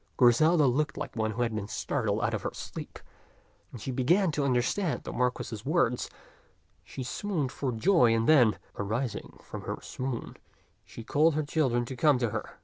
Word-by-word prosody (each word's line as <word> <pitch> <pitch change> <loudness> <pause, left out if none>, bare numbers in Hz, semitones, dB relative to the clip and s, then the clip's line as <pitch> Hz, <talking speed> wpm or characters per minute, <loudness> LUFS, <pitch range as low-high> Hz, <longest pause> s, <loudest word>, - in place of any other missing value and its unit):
Griselda 150 +6 +5
looked 145 +4 +1
like - - -5
one 110 -1 0
who 115 +3 -1
had 115 -2 -1
been 105 -2 -3
startled - - -1
out - - 0
of - - -2
her - - -2
sleep. - - -7 0.7
As 120 - -9
she 130 - -3
began 165 +9 +2
to 145 -1 -1
understand 140 +7 0
the - - -6
Marquis's 125 -3 -2
words, 140 -5 +1 0.7
she 130 - -7
swooned 150 - -2
for 135 -3 -2
joy; 125 - +4
and 115 0 0
then, 125 -9 +5 0.2
arising 110 +4 -3
from - - -7
her - - -4
swoon, 130 -2 -5 0.5
she 115 - -10
called 155 +6 +3
her 155 - +1
children 130 -5 +1
to 130 - -6
come 145 +2 +4
to 120 -3 -1
her. 110 0 -5
130 Hz, 180 wpm, -29 LUFS, 120-150 Hz, 0.7 s, Griselda